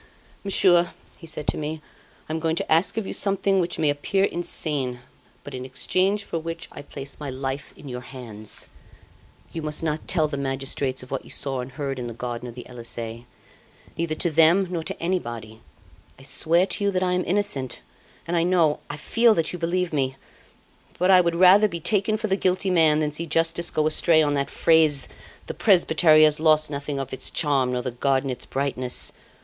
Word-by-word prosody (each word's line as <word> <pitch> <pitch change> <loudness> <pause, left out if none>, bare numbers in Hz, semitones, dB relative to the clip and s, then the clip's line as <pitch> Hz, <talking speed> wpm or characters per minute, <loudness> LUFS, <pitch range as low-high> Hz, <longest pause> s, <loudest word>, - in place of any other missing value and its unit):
"'Monsieur,' 175 -4 +3 0.3
he 165 - -11
said 155 -1 -6
to - - -1
me, 155 +1 -4 0.5
'I 155 - -4
am 160 - -1
going 160 0 0
to - - -3
ask 165 +7 +3
of 225 - -1
you - - -4
something 195 -1 +1
which 175 -1 -1
may 150 -2 +2
appear 170 +7 0
insane, 145 -9 -2 0.4
but 145 - -9
in 130 -1 -5
exchange 185 +10 0
for 165 - -4
which 165 +1 -6
I - - -9
place 140 -1 -9
my 145 -2 -5
life 135 +1 -4
in 145 - -12
your 125 -1 -5
hands. 115 -5 -8 0.9
You 165 - -4
must 150 +1 -1
not 155 -1 -2
tell 160 -4 +2
the 140 -2 -4
magistrates 135 -1 -2
of 130 - -13
what 135 - -3
you - - -15
saw 135 -2 -2
and 125 +1 -9
heard 135 -1 -4
in 120 - -4
the 115 - -7
garden 120 0 -5
of 120 - -11
the 125 - -9
Elysee, 115 -1 -7 0.7
neither 165 -1 -2
to 170 +1 -1
them 165 +4 +4
nor 170 -3 -2
to - - -4
anybody. 120 -11 -3 0.6
I 135 - -15
swear 165 +5 +2
to 200 - -3
you, 200 - +3
that 185 -1 0
I 180 - +1
am 180 0 +1
innocent, 185 -10 -2 0.4
and 175 - -2
I 170 - +3
know, 170 -4 +2
I - - -5
feel, 230 +8 +3
that 165 +1 -1
you 180 - -5
believe 175 +1 -1
me; 135 -2 0 0.8
but 180 +2 +3
I 185 -1 +8
would 170 -1 0
rather 190 +4 +7
be 170 -4 -5
taken 210 +4 +1
for 220 - -4
the 195 -3 +1
guilty 185 0 +1
man 160 -3 +4
than 150 -1 0
see 165 +3 -1
justice 165 +2 +1
go 155 - 0
astray 155 +1 +4
on 145 -1 +1
that 140 -1 -1
phrase, 155 -4 +3 0.4
"The - - -5
presbytery 160 -5 +5
has 150 -1 +4
lost 155 -1 +3
nothing 140 0 -4
of 135 -1 -5
its 130 - -2
charm, 135 -5 +1
nor 125 0 -2
the 125 - -3
garden 135 +2 0
its 125 - -6
brightness." 130 -2 -2
155 Hz, 205 wpm, -24 LUFS, 135-175 Hz, 0.9 s, I